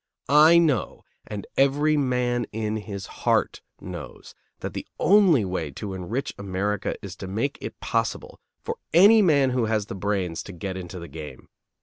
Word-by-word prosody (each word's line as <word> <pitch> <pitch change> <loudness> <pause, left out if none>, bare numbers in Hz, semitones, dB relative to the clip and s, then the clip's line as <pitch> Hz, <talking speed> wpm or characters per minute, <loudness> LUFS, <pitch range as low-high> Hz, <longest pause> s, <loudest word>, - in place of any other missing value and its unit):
I 155 +4 +7
know, 155 -8 +1 0.2
and 105 -1 -6
every 145 +3 +3
man 125 -3 0
in 110 0 -2
his 100 -2 -6 0.2
heart - - +1 0.2
knows, 85 -7 -9 0.3
that - - -5
the - - -6
only 185 - +5
way 90 -5 -3
to 100 +6 -6
enrich 105 +9 -4
America 100 +1 -2
is 95 -2 -7
to 95 - -7
make 110 +9 -2
it - - -7
possible - - -2 0.2
for - - -4 0.2
any 210 +5 +8
man 140 -8 +4
who 125 -2 +1
has 110 -2 0
the - - -7
brains 95 -4 -2
to 100 - -9
get 95 +2 -5
into 90 0 -7
the 85 -1 -8
game. 75 -3 -10
105 Hz, 165 wpm, -25 LUFS, 95-140 Hz, 0.3 s, any